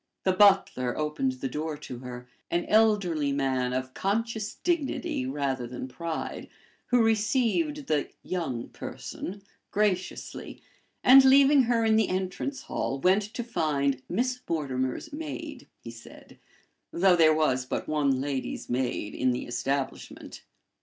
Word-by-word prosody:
The 190 - +3
butler 190 -11 +4
opened 150 -4 -1
the 130 +1 -4
door 150 +3 -4
to 130 -4 -8
her 125 -1 -8 0.2
an 175 0 0
elderly 200 -9 +3
man, 130 -2 0
of 130 0 -3
conscious 220 +1 -2
dignity 300 - -1
rather 135 -3 -2
than 125 +1 -6
pride, 165 +5 -5 0.4
who 245 -2 +4
received 255 +7 +1
the 150 - 0
"young 135 -10 -3
person" 195 +2 -7 0.3
graciously, 195 -3 -2 0.4
and, 265 +2 +9
leaving 275 +1 +6
her 230 -1 +2
in 220 0 +4
the 220 - +2
entrance 190 +9 -3
hall, 135 - -3
went 185 +7 +4
to 215 +4 -5
find 140 - 0
"Miss 250 +5 0
Mortimer's 135 - -2
maid," 300 -2 -6
he 115 - -8
said, 115 0 -14 0.5
though 185 +1 +4
there 160 -2 +5
was 130 -5 +1
but - - -3
one 145 -4 +1
lady's 135 -2 -3
maid 120 -4 -2
in 130 - +1
the 125 0 -1
establishment. 135 +2 -4
165 Hz, 135 wpm, -27 LUFS, 130-220 Hz, 0.5 s, and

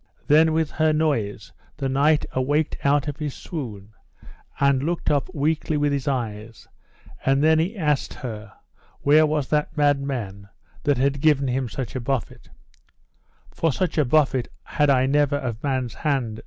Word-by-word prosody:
Then 160 +2 +5
with 160 -1 0
her 155 0 +2
noise 115 - -1 0.3
the 135 -2 -2
knight 145 +3 +2
awaked 145 +4 0
out 140 +1 +2
of 145 -1 -4
his 150 -4 -4
swoon, 110 - -7 0.7
and 140 -2 +3
looked 165 +2 -1
up 145 +2 0
weakly 155 -1 -1
with 145 0 +1
his 140 0 -2
eyes; 115 -4 -4 0.6
and 135 +2 +2
then 160 0 +4
he 185 +7 -1
asked 150 -6 0
her, 110 -5 -7 0.5
where 155 +2 +5
was 150 -3 -1
that 150 +1 -1
mad 145 -1 +3
man 100 -8 -5 0.4
that 145 -3 +2
had 135 +2 0
given 145 -3 +3
him 125 -1 -1
such 130 +1 -5
a - - -1
buffet: 125 -4 -4 1.0
For 165 - 0
such 165 +2 -1
a - - +5
buffet 135 -2 +2 0.2
had 145 -1 +1
I 130 -2 +4
never 145 +1 +2
of 120 -4 -4
man's 130 -4 -2
hand. 130 -8 -2
140 Hz, 165 wpm, -23 LUFS, 130-150 Hz, 1.0 s, Then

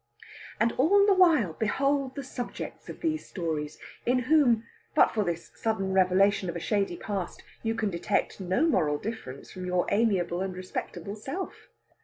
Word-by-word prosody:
And 230 +1 +3
all 400 +9 +5
the 405 - +5
while 320 - +4
behold 275 - 0
the 280 - -4
subjects 245 -2 -6
of - - -8
these 315 -2 -1
stories, 155 -4 -3 0.3
in 250 +2 +2
whom, 250 -3 +4 0.3
but - - +6
for 215 - +1
this 170 -2 -4
sudden 195 -4 -1
revelation 190 0 +3
of 170 - -4
a - - -2
shady 195 -1 0
past, 195 -4 -4 0.2
you 225 0 -1
can 215 -3 -1
detect 175 +5 -1
no 190 - +1
moral 150 - +2
difference 145 - -7
from 185 -1 -6
your 180 -1 +1
amiable 195 -5 +2
and 190 -1 -3
respectable 185 0 -5
self! 270 - -6
205 Hz, 165 wpm, -28 LUFS, 180-255 Hz, 0.3 s, but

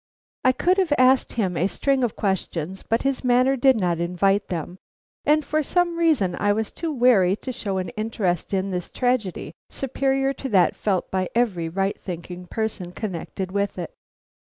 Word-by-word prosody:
I 255 - +6
could 360 +9 +2
have 365 -5 +1
asked 255 +1 +4
him 190 -6 -1
a 180 - +2
string 270 +5 0
of 235 - -1
questions, 190 -2 -2
but 225 +1 -1
his 275 -1 -1
manner 255 +2 +3
did 260 -2 +4
not 175 -3 0
invite 195 +4 +1
them, 175 +1 -5 0.5
and 300 0 +3
for 310 0 +1
some 345 +3 +1
reason 300 - +2
I 205 0 +3
was 220 +1 -2
too 330 -1 -4
wary 235 -9 +4
to 255 - -6
show 200 -5 -3
an 185 -1 -2
interest 215 -6 -2
in 195 0 -1
this 180 -1 -3
tragedy 225 - -1 0.2
superior 270 0 0
to 270 - -6
that 185 -5 +3
felt 190 -4 -1
by 185 -1 -1
every 190 -9 +1
right 195 +3 -1
thinking 180 0 -7
person 210 -5 -3
connected 190 -2 -5
with 200 0 -1
it. 175 -2 -5
205 Hz, 175 wpm, -23 LUFS, 185-260 Hz, 0.5 s, I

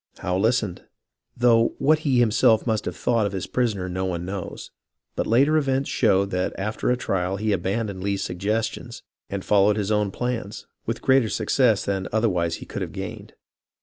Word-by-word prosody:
Howe 90 - -2
listened, 110 -2 0 0.6
though 115 -1 +3
what 155 +2 +3
he 140 -5 +1
himself 110 -1 +4
must 110 -3 0
have - - -4
thought 115 -4 +1
of 100 - -6
his 95 - -3
prisoner 110 -7 -1
no 95 +1 -3
one 90 -2 -3
knows; 95 0 -6 0.4
but - - -1
later 140 +7 +4
events 135 -2 0
showed 100 -4 +2
that 90 0 -1
after 105 +5 -2
a 125 - +2
trial 95 -4 -1
he 110 +1 -1
abandoned 100 +1 -2
Lee's 100 0 -1
suggestions 110 +5 -3 0.3
and 100 -1 -4
followed 105 +1 +4
his 105 0 -1
own 105 -1 +2
plans, 115 -1 -4 0.2
with 115 +1 -3
greater 130 -4 +4
success 110 +1 +2
than 95 -1 -2
otherwise 90 -7 +1
he - - -9
could - - -6
have - - -4
gained. - - -7
105 Hz, 180 wpm, -24 LUFS, 95-120 Hz, 0.6 s, himself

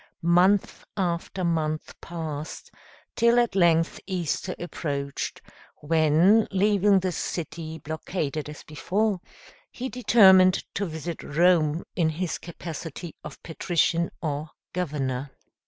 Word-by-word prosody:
Month 180 +4 +3
after 180 0 -2
month 155 -2 -1
passed, 155 -3 -6 0.4
till 235 +1 +4
at 240 -1 +3
length 170 -3 +3
Easter 180 -1 -2
approached, 140 -5 -4 0.4
when, 165 +7 +4
leaving 200 0 +3
the 185 0 -1
city 160 -1 -4
blockaded 155 0 -4
as 150 - -10
before, 195 +5 -1 0.5
he 255 +1 -5
determined 190 -7 +6
to 200 - -2
visit 160 +1 -5
Rome 165 0 +2
in 165 -3 +2
his 170 +2 -3
capacity 165 -1 -7
of - - -10
patrician 170 0 0
or 150 0 -2 0.2
governor. 140 -6 -2
170 Hz, 105 wpm, -26 LUFS, 155-185 Hz, 0.5 s, determined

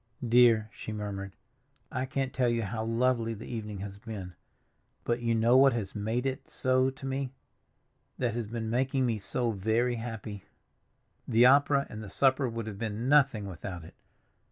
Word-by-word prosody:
"Dear," 115 -2 +5
she - - -7
murmured, 100 -2 -5 0.6
"I 130 0 -2
can't 135 -1 -2
tell 125 -2 +2
you 115 -1 0
how 110 +2 -3
lovely 115 0 +1
the - - -9
evening 105 -4 -5
has 100 0 -7
been; 100 -5 -7 0.7
but 120 0 -1
you 115 -1 +1
know 115 +2 +4
what 135 -1 +6
has 105 -5 -3
made 110 +5 -2
it 135 0 -3
so 130 0 +2
to 135 0 -10
me, 135 -1 -3 0.8
that 120 -4 0
has 115 -2 -3
been 110 0 -4
making 130 +2 +1
me 115 -3 0
so 120 +4 -1
very 110 +4 0
happy? 110 -4 -6 0.8
The 115 +2 +5
opera 140 +1 +5
and 110 - -8
the 105 - -8
supper 130 +3 +2
would 115 -1 -4
have 105 -3 -7
been 115 +2 -3
nothing 135 -8 +4
without 90 -2 -7
it. 80 - -13
115 Hz, 175 wpm, -29 LUFS, 105-130 Hz, 0.8 s, what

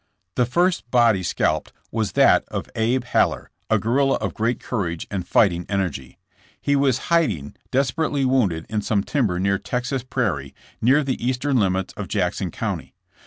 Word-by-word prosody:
The 125 -2 +1
first 175 -1 +1
body 115 -5 +4
scalped 80 -3 -1 0.2
was 110 -4 -1
that - - +5
of - - -4
Ab. 115 +3 +1
Haller, 120 - 0 0.2
a - - +4
guerrilla 135 +4 +2
of 100 -5 -3
great 115 +3 -1
courage 85 -9 -3
and 95 -3 -3
fighting 90 -4 +3
energy. 85 -11 -3 0.4
He 145 - +1
was 140 +1 +1
hiding, 105 - +1
desperately 140 +2 0
wounded, 105 -12 +1
in 110 -1 -1
so 105 - -2
me 100 - +2
timber 115 -12 0
near 100 +1 +1
Texas 130 +1 -2
Prairie, 90 - -2 0.3
near 135 +6 +4
the 130 -3 -3
eastern 130 +2 +1
limits 95 -3 0
of - - -6
Jackson - - -1
County. - - -4
115 Hz, 165 wpm, -22 LUFS, 95-130 Hz, 0.4 s, that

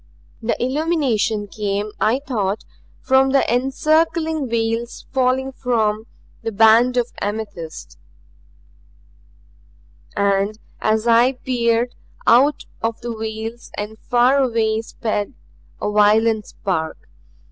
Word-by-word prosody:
The 230 +1 -1
illumination 255 -6 0
came, 205 0 -3
I 225 +4 +3
thought, 210 -5 -2 0.4
from 265 0 +3
the 275 - +4
encircling 310 +3 +1
veils 230 +1 -2
falling 265 +1 +1
from 225 -4 -1 0.3
the 225 -1 -3
band 225 +4 +5
of 245 -1 0
amethyst. 205 -6 -5 2.2
And, 200 +1 +1 0.2
as 215 +1 +1
I 235 +2 +5
peered, 240 -2 0 0.3
out 270 +5 +4 0.2
of 225 0 -2
the 235 -1 -4
veils 220 +1 -6
and 210 +1 -5
far 250 +2 +3
away 225 -4 +1
sped 220 0 -3 0.4
a 210 - -2
violet 215 +1 +3
spark. 160 -5 -3
230 Hz, 105 wpm, -20 LUFS, 215-255 Hz, 2.2 s, band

